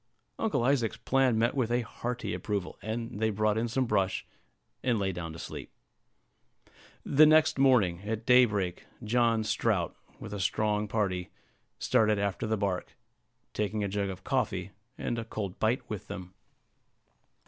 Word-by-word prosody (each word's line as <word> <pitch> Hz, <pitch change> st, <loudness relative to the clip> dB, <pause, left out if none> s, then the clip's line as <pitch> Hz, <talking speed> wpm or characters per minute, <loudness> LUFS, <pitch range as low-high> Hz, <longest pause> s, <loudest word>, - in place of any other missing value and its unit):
Uncle 175 Hz, -, +1 dB
Isaac's 125 Hz, -4 st, +1 dB
plan 130 Hz, -3 st, +2 dB
met 115 Hz, +2 st, +2 dB
with 130 Hz, -5 st, 0 dB
a 120 Hz, +1 st, +2 dB
hearty 120 Hz, +2 st, -4 dB
approval; 100 Hz, -4 st, -3 dB
and 110 Hz, -1 st, -4 dB
they 110 Hz, 0 st, +2 dB
brought 105 Hz, 0 st, +1 dB
in 115 Hz, +2 st, 0 dB
some 130 Hz, +3 st, 0 dB
brush, 95 Hz, -5 st, 0 dB, 0.6 s
and 125 Hz, -3 st, +1 dB
lay 100 Hz, -2 st, 0 dB
down 85 Hz, -2 st, -5 dB
to 80 Hz, -, -9 dB
sleep. -, -, -7 dB, 1.4 s
The 150 Hz, +2 st, +6 dB
next 155 Hz, -2 st, +5 dB
morning, 110 Hz, -11 st, +4 dB
at 110 Hz, +2 st, -4 dB
daybreak, 105 Hz, -8 st, +3 dB, 0.2 s
John 115 Hz, 0 st, +2 dB
Strout, 105 Hz, -5 st, 0 dB, 0.2 s
with 105 Hz, -, -7 dB
a 105 Hz, -, -4 dB
strong 105 Hz, +2 st, 0 dB
party, 95 Hz, -4 st, -1 dB, 0.5 s
started 110 Hz, -4 st, +3 dB
after 100 Hz, +1 st, -1 dB
the 110 Hz, 0 st, +1 dB
bark, 100 Hz, -3 st, -2 dB, 0.6 s
taking 105 Hz, 0 st, -1 dB
a -, -, 0 dB
jug 100 Hz, 0 st, -1 dB
of 95 Hz, 0 st, -7 dB
coffee -, -, -1 dB, 0.3 s
and 120 Hz, -, -2 dB
a -, -, -3 dB
cold 105 Hz, -4 st, -5 dB
bite 115 Hz, +4 st, +1 dB
with 105 Hz, -4 st, -6 dB
them. 95 Hz, -2 st, -7 dB
110 Hz, 155 wpm, -29 LUFS, 100-120 Hz, 1.4 s, The